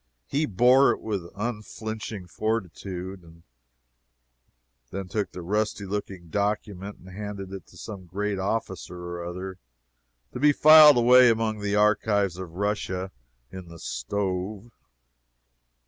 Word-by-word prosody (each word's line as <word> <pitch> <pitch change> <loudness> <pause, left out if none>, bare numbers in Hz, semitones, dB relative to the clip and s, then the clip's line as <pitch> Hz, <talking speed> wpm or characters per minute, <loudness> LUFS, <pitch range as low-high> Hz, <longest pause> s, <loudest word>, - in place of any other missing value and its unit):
He 150 +2 0
bore 125 +7 +5
it - - 0
with 100 -6 -4
unflinching 110 -2 -5
fortitude; 90 -4 -5 1.5
then 95 0 -5
took 100 -1 -2
the 90 - -8
rusty 105 +2 -1
looking 95 -3 -5
document 100 0 -2
and 95 - -15
handed 100 0 -7
it 95 -4 -8
to - - -17
some 95 -4 -8
great 100 +2 -2
officer 95 -3 -3
or 85 0 -6
other, 90 +2 -6 0.7
to - - -5
be 145 +2 +5
filed 155 -2 +9
away 125 +1 +7
among 110 -1 0
the 105 0 -1
archives 105 -3 +2
of 85 -3 -8
Russia 95 -2 -2 0.4
in 95 -2 -9
the 85 0 -11
stove. 95 - -3
100 Hz, 125 wpm, -26 LUFS, 90-110 Hz, 1.5 s, filed